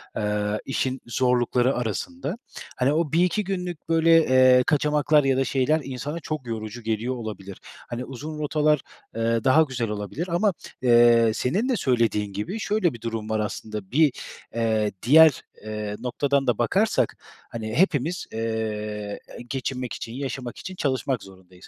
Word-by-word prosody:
eee, 105 0 -1
işin 130 -1 -2
zorlukları 125 +1 +1
arasında. 215 - -3 0.4
Hani, 130 +3 +2
o 155 -2 0
1-2 180 +5 +2
günlük, 180 -4 -5
böyle, 165 0 +4 0.2
eee, 130 0 +6
kaçamaklar 150 0 +3
ya 135 -1 +2
da 135 - +3
şeyler 140 +4 +1
insana 135 +5 -5
çok 155 -4 -5
yorucu 110 +1 -5
geliyor 115 +3 -1
olabilir. 105 -4 -7 0.3
Hani, 125 +1 -4
uzun 150 +4 -7
rotalar, 150 -1 +2 0.3
eee, 115 0 0
daha 135 +4 +5
güzel 130 -7 -1
olabilir 105 - -4
ama, 195 +3 +2 0.3
eee, 120 -2 +5
senin 190 - 0
de 255 - +2
söylediğin 115 -5 +1
gibi 105 - -4
şöyle 205 - +1
bir 115 - -11
durum 115 -2 -4
var 110 0 0
aslında: 105 -1 -5
Bir, 150 +2 +4 0.4
eee, 110 -2 +1
diğer, 155 +4 +7 0.2
eee, 105 -1 -4
noktadan 135 +2 0
da 120 -4 +2
bakarsak, 195 - +1 0.4
hani, 110 -1 -5
hepimiz, 170 0 +1
eee, 105 -2 -3 0.3
geçinmek 130 -2 -3
için, 115 - -6
yaşamak 130 -2 -5
için 185 - -7
çalışmak 130 - -1
zorundayız. 95 -1 -16
125 Hz, 145 wpm, -24 LUFS, 110-150 Hz, 0.4 s, diğer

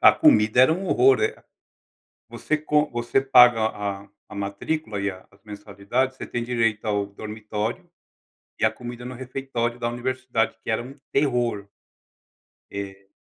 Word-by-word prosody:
a - - +8
comida 110 +3 +4
era 130 +5 +6
um 185 +4 -3
horror. 400 - +5 1.1
Você 155 - -2
co 150 0 +1
você 120 +2 0
paga 125 -4 +6
a 100 -2 -4 0.2
a - - -11
matrícula 100 +5 -3
e 100 0 0
a 95 0 -12
as 100 0 -25
mensalidades, 105 +5 -3
você - - -7
tem 120 - -3
direito 115 -3 0
ao 105 -1 +1
dormitório 105 - -5 0.7
e - - +2
a - - +5
comida, 120 0 -8
no 125 - -6
refeitório 125 -2 -3
da 120 0 -1
universidade 120 -1 -2
que - - -4
era 110 +1 0
muito 135 +2 -12
terror. 120 -7 0 1.0
Eh. 100 -1 -7
120 Hz, 150 wpm, -24 LUFS, 105-130 Hz, 1.1 s, a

